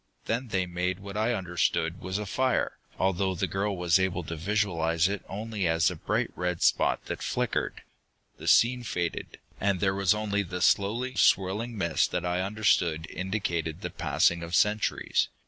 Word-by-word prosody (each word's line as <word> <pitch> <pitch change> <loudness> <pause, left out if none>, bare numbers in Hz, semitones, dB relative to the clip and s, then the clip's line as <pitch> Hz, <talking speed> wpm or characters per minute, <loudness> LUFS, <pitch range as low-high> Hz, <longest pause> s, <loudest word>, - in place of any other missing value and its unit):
Then 120 +3 -1
they 95 -4 0
made 90 +1 -2
what 100 0 -9
I 110 +3 +1
understood 85 -2 -1
was 95 +1 -3
a 105 - -3
fire, 130 +6 0 0.2
although 95 0 +1
the - - 0
girl 100 0 -2
was 90 0 +3
able 95 -1 0
to 80 +2 -5
visualize 85 -2 +1
it 100 +1 -3
only 105 -1 -3
as 80 0 +3
a - - -6
bright - - -1
red 90 -1 -2
spot - - +2
that - - -5
flickered. - - -2 0.6
The - - -8
scene 125 +1 +5
faded, 85 -7 -3 0.2
and 100 -2 +1
there 95 0 +2
was 100 +1 +2
only 105 -1 0
the 90 -1 -5
slowly 115 +6 +2
swirling 105 +2 +2
mist 85 -4 +1
that 90 - -1
I 90 +1 0
understood 95 -5 +1
indicated 85 -4 -2
the - - -4
passing 85 -1 +1
of 85 +1 -3
centuries. 105 +4 +2
95 Hz, 170 wpm, -28 LUFS, 85-105 Hz, 0.6 s, scene